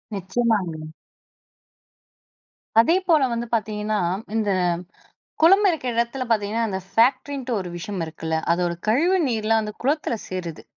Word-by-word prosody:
நிச்சயமாங்க. 185 -5 -1 1.9
அதேபோல 335 +4 +4
வந்து 235 0 -3
பார்த்தீங்கணா, 215 -1 -1 0.4
இந்த 215 -2 +1 0.9
குளம் 390 +6 +6
இருக்கிற 295 -7 -2
இடத்தில 235 +3 -1
பார்த்தீங்கன்னா, 220 +1 +1
அந்த 190 -2 -3
ஃபேக்ட்ரின்ட்டு 260 +3 +1
ஒரு 185 - -5
விஷயம் 185 +1 -4
இருக்குல்ல, 160 0 -3 0.2
அதோட 175 0 0 0.2
கழிவு 330 - +3
நீர்லாம் 225 -1 +1
அந்த 210 - -5
குளத்தில 285 -3 0
சேருது. 175 -4 -5
225 Hz, 110 wpm, -23 LUFS, 190-255 Hz, 1.9 s, குளம்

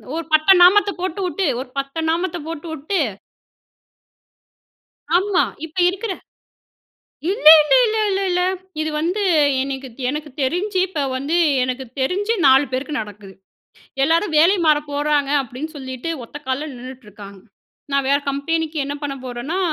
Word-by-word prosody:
ஒரு 330 0 -4
பட்டை 310 +5 +6
நாமத்த 405 +3 +5
போட்டு 370 0 -3
வுட்டு 365 +1 -2 0.2
ஒரு 260 - -9
பட்டை 275 +4 -5
நாமத்த 345 +1 -1
போட்டு 330 0 -7
வுட்டு. 320 +5 -2 2.2
ஆமா. 380 0 +2 0.2
இப்ப 320 +3 -12
இருக்கிற. 390 +3 -3 1.2
இல்லே 385 -7 +8
இல்லே - - +4
இல்ல 440 0 -1
இல்ல 390 0 0
இல்ல. 360 0 +1 0.4
இது 310 0 -1
வந்து 360 +6 -1 0.4
எனக்கு 270 -1 -5 0.2
எனக்கு 300 +2 -4
தெரிஞ்சு 370 +9 -1
இப்போ 320 -6 -3
வந்து 285 +6 -1 0.3
எனக்கு 255 +1 -4 0.2
தெரிஞ்சு 400 +11 0
4 265 +2 +6
பேருக்கு 285 +4 -3
நடக்குது. 205 -2 -10 0.7
எல்லாரும் 325 +3 +1
வேலை 345 +6 +5
மாற 305 -1 +5
போறாங்க 290 -1 0
அப்பிடீன்னு 270 +5 -7
சொல்லிட்டு, 260 +3 -6
ஒத்த 290 - -10
கால்ல 270 +4 -2
நின்னுட்ருக்காங்க. 210 -6 -11 0.5
நான் 275 -1 +1
வேற 280 - +4
கம்பெனிக்கு, 315 +3 -2
என்ன 285 - -4
பண்ண 280 -1 -3
போறேன்னா 250 +9 -4
305 Hz, 135 wpm, -20 LUFS, 265-355 Hz, 2.2 s, இல்லே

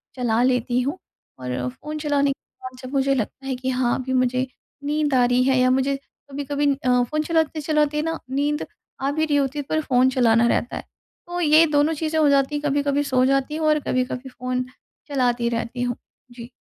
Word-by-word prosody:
चला 240 -3 +1
लेती 250 -1 +1
हूँ, 280 +8 -2 0.4
और 125 0 -3
फ़ोन 300 - -7
चलाने 285 -2 +1
के 275 - -6 0.2
बाद 255 0 -8
जब 255 0 -8
मुझे 275 0 +2
लगता 260 +2 -4
है 265 - -1
कि 255 +1 -3
हाँ 250 -1 +1
अभी 260 0 -3
मुझे 255 0 +1 0.4
नींद 295 0 0
आ 255 -1 +4
रही 245 +1 +3
है 265 0 +3
या 255 0 +4
मुझे 265 +2 +1
कभी-कभी 285 +1 -4
अ, 250 -2 +2
फ़ोन 305 +5 -2
चलाते-चलाते 305 -2 +1
ना 325 +1 -2
नींद 290 +3 -1 0.4
आ 275 +1 0
भी 315 +2 0
रही 300 -2 0
होती 280 +1 0
है, - - -2
पर 315 - +1
फ़ोन 260 -3 +3
चलाना 235 -2 +3
रहता 240 - 0
है। - - -6 0.4
तो 350 0 -4
ये 310 0 +6
दोनों 295 +1 +2
चीज़ें 315 +1 -1
हो 305 - +4
जाती 280 +1 +2
हैं, 295 - -2
कभी-कभी 285 0 +1
सो 255 -2 +2
जाती 275 +2 +1
हूँ, 315 0 0
और 305 0 +4
कभी-कभी 255 +1 -1
फ़ोन 255 0 -3 0.4
चलाती 245 -4 +1
रहती 235 +1 -3
हूँ। 245 -1 -1 0.4
जी। 240 0 -10
270 Hz, 200 wpm, -23 LUFS, 250-295 Hz, 0.4 s, ये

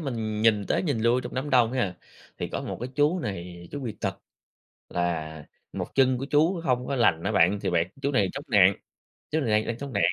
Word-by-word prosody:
mình 110 -7 -3
nhìn 105 -3 +3
tới - - +1
nhìn 145 -10 -1
lui 120 +2 +3
trong 120 - -7
đám 135 +3 -3
đông 120 -3 +4
ấy, 130 - 0
à, 95 -5 -1 0.4
thì - - -3
có - - -4
một - - -5
cái 125 - -3
chú 150 +6 +2
này 85 - -6
chú 145 - -5
bị 120 -5 -4
tật, 95 -1 -2 0.7
là 80 -3 -2 0.3
một - - -3
chân 130 -2 +4
của 135 - -4
chú 160 +5 +2
hông 125 -4 0
có 140 - -1
lành 90 -9 +3
á 100 - 0
bạn, 100 +1 +3
thì 95 - -1
bạn 85 -1 +1
chú 140 +1 0
này 100 -7 +2
chống 140 - -5
nạng, 100 -4 +6 0.6
chú 160 +1 +1
này 120 - -1
đang 105 0 +2
đang 115 0 -3
chống 140 -2 -6
nạng. 100 - +2
115 Hz, 245 wpm, -26 LUFS, 95-135 Hz, 0.7 s, nạng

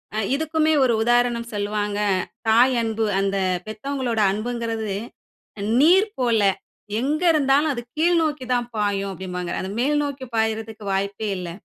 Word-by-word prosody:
ஆ. - - 0 0.2
இதுக்குமே 315 +1 +1
ஒரு 240 -2 +3
உதாரணம் 240 0 +1
சொல்லுவாங்க. 205 0 -2 0.5
"தாய் 245 +3 +5
அன்பு 225 -1 -1 0.2
அந்த 195 0 0 0.3
பெத்தவங்களோட 240 0 -2
அன்புங்கறது 225 -2 -3 0.9
நீர் 375 +7 +5
போல, 235 -4 +2 0.6
எங்க 295 +6 -1
இருந்தாலும் 290 +1 +3
அது 240 - -4 0.2
கீழ் 340 +2 +3
நோக்கி 295 -4 -2
தான் 240 -1 0
பாயும்" 200 -1 -1
அப்டிம்பாங்க. 180 -2 -5
அத 190 - -5
மேல் 295 +3 +2
நோக்கி 280 -2 -5
பாய்றதுக்கு 220 -1 -2
வாய்ப்பே 200 +2 -2
இல்ல. 180 -1 -5
230 Hz, 135 wpm, -23 LUFS, 210-275 Hz, 0.9 s, தாய்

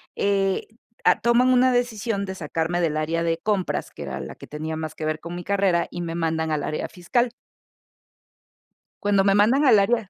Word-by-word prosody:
eh, 195 -1 +1
t 220 - -29 0.3
ah, - - +5
toman 235 +2 +4
una 255 +1 +5
decisión 225 -4 -1
de 190 - -5
sacarme 165 +2 -2
del 155 -2 0
área 165 +2 -1
de 165 -1 0
compras, 195 0 -1
que - - -11
era - - -5
la - - -7
que - - -12
tenía 155 +1 -5
más 155 -1 -5
que 155 - -5
ver 155 0 -1
con 170 +2 -7
mi 175 - -6
carrera, 195 -4 +1
y 175 - -5
me 165 -1 -4
mandan 160 -1 -1
al 150 -2 -1
área 155 - -3
fiscal. 235 +7 0 1.7
Cuando 200 -1 +3
me 195 0 +3
mandan 240 +8 +4
al 230 -6 +7
área 215 0 +1
190 Hz, 200 wpm, -24 LUFS, 165-220 Hz, 1.7 s, al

